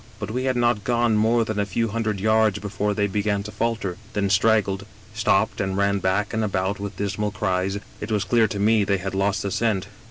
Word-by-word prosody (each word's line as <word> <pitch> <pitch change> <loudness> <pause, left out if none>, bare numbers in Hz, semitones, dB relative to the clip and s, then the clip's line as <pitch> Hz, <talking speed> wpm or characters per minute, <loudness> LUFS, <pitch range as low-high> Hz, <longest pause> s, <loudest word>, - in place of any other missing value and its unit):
" - - -23
But 105 0 -4
we 130 +3 -2
had 130 -1 +1
not 120 -3 +1
gone 120 0 +2
more 115 +2 +3
than 110 -1 -3
a 100 - +1
few 115 +4 -1
hundred 110 -2 -2
yards 110 0 +3
before 105 0 -2
they 105 - +1
began 100 0 -1
to 105 - -7
falter, 115 -6 -2 0.2
then 100 -2 0
straggled, 100 0 +2 0.3
stopped 110 -1 +1
and 95 -1 -2
ran 100 0 +2
back 95 +3 0
and 110 0 0
about 100 -1 -1
with 100 -2 -6
dismal 105 +1 -1
cries. 95 -1 -1 0.2
It 105 - -5
was 105 -2 +1
clear 115 -2 +3
to 100 - -5
me 105 +1 +3
they 100 0 +1
had 95 +1 -5
lost 100 +2 0
the 100 - -2
scent. 105 -1 0
105 Hz, 225 wpm, -23 LUFS, 100-110 Hz, 0.3 s, more